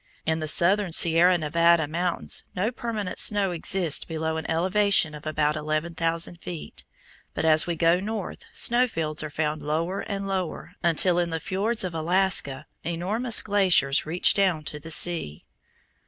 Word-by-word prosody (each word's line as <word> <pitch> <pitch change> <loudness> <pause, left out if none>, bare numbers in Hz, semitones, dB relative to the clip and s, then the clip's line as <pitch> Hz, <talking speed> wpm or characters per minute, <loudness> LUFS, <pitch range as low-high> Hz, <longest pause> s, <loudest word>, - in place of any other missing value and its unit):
In 160 0 0
the 155 - -4
southern 185 +3 +3
Sierra 170 +2 +4
Nevada 170 0 +2
mountains 170 +3 -2
no 205 +6 -1
permanent 220 -6 -4
snow 205 -3 +2
exists 170 -1 0
below 160 0 -4
an 160 - -6
elevation 185 0 +2
of 150 +1 -9
about 150 -1 0
eleven 155 +2 -3
thousand 165 +1 -2
feet, 170 -3 -9 0.5
but - - -2
as 155 +1 +3
we 170 - -2
go 165 +2 +2
north 210 0 -6
snow 245 +2 +3
fields 155 -8 -4
are 155 - -5
found 150 0 -3
lower 165 +6 -2
and 200 -1 -5
lower, 190 -3 -4
until 175 +1 +2
in 175 -1 -1
the 165 0 -3
fiords 200 +7 -1
of 180 -2 -4
Alaska 165 -4 0 0.2
enormous 205 +9 0
glaciers 185 -9 +2
reach 165 +3 +2
down 185 -6 0
to 150 0 -6
the 160 - -11
sea. 160 - +2
170 Hz, 160 wpm, -25 LUFS, 155-190 Hz, 0.5 s, Sierra